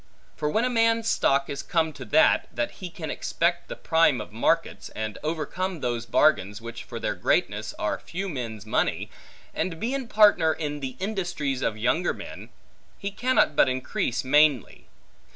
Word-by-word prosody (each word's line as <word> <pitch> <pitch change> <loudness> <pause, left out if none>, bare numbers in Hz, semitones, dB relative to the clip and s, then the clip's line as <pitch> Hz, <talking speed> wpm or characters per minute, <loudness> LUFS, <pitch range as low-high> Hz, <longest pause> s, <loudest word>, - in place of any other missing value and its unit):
For 150 - -1
when 220 +10 +1
a - - +1
man's 230 -1 +2
stock 140 -9 +2
is 140 -1 -4
come 160 -2 0
to - - -9
that, 155 - +4
that 120 0 -2
he 185 - -8
can 160 -3 -6
expect 170 +1 -1
the - - -5
prime 160 -6 +3
of 105 - -7
markets, 110 +2 0
and 110 -1 -4
overcome 165 +4 -3
those 120 -2 -2
bargains, 105 -9 +2
which 115 0 -8
for - - -7
their - - -1
greatness - - 0
are - - -1
few 190 +3 -5
men's 115 - -5
money, 110 - -1 0.4
and 165 -3 -2
be 245 +7 -1
partner 210 -8 +5
in 150 -2 -4
the 130 -2 -6
industries 175 -9 -2
of 110 - -1
younger 160 +10 +1
men, - - -9 0.5
he 200 - -4
cannot 245 - +2
but - - +5
increase 130 -1 -2
mainly. 145 -3 +2
155 Hz, 170 wpm, -26 LUFS, 125-185 Hz, 0.5 s, partner